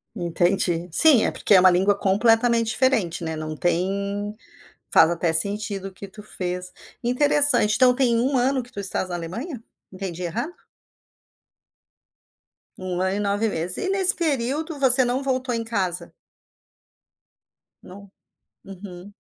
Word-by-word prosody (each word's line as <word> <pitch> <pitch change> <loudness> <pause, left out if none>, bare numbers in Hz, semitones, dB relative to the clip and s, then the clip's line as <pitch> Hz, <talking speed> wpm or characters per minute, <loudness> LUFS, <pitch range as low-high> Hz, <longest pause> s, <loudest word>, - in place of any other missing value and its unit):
Entendi. 175 0 -1
Sim, 260 - +5
é - - 0
porque - - 0
é 190 - +7
uma 185 - +6
língua 190 +3 +2
completamente 225 +3 +1
diferente, 225 -10 -1
né. 160 -1 -4
Não 155 0 -6
tem 200 +5 -3 0.6
faz - - +5
até 170 -1 -1
sentido 200 +3 0
o - - -10
que 200 +1 -11
tu 210 +2 -13
fez. 180 -2 -6 0.3
Interessante, 250 -3 +3
então 250 +1 +3
tem 250 -3 +1
um 260 +2 0
ano 260 +2 0
que 245 - -18
tu 200 - -9
estás 190 -1 -4
na 175 - -4
Alemanha? 225 - -7 0.3
Entendi 185 -2 -7
errado? 230 - -4 2.2
1 185 -1 -5
ano 190 +1 -1
e - - -3
9 205 +2 -1
meses. 175 +1 +1
E, 380 - -3
nesse 385 -1 +5
período, 300 0 -2
você 260 -1 +7
não 250 +3 -2
voltou 260 -1 -2
em 230 - -3
casa? 190 -6 -4 1.7
Não. 200 +1 -14 0.5
Uhum. 190 0 -12
205 Hz, 145 wpm, -22 LUFS, 180-250 Hz, 2.2 s, é